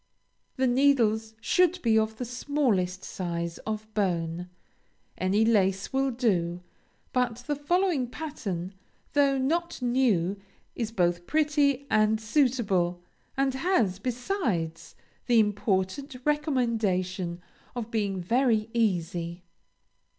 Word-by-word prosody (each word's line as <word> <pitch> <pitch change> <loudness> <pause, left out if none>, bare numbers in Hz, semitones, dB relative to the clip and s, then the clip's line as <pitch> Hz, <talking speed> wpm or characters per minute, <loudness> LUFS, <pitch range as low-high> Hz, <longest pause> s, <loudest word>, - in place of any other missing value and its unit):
The 260 - +1
needles 240 -4 +2
should 365 +4 +3
be 225 -1 +3
of 220 0 -1
the 250 - -3
smallest 235 -8 0
size, 170 -2 -4
of 215 0 -3
bone. 175 -3 -1 0.7
Any 200 +4 +2
lace 195 -1 +2
will 270 0 +2
do; 180 -8 0 0.5
but 245 -1 0
the 295 - -1
following 320 -2 +1
pattern, 200 - -5 0.4
though 280 -1 +3
not 335 +6 -1
new, 240 -8 +1 0.4
is 230 -2 -3
both 175 -4 0
pretty 290 -3 +2
and 215 0 +3
suitable; 210 - +1 0.3
and 270 -1 +2
has, 265 - +1
besides, 235 - -2 0.3
the 240 -2 +5
important 205 +5 0
recomendation 220 - 0 0.4
of 235 -2 -4
being 200 -4 -1
very 225 +1 +2
easy. 175 -5 -1
220 Hz, 105 wpm, -27 LUFS, 185-265 Hz, 0.7 s, the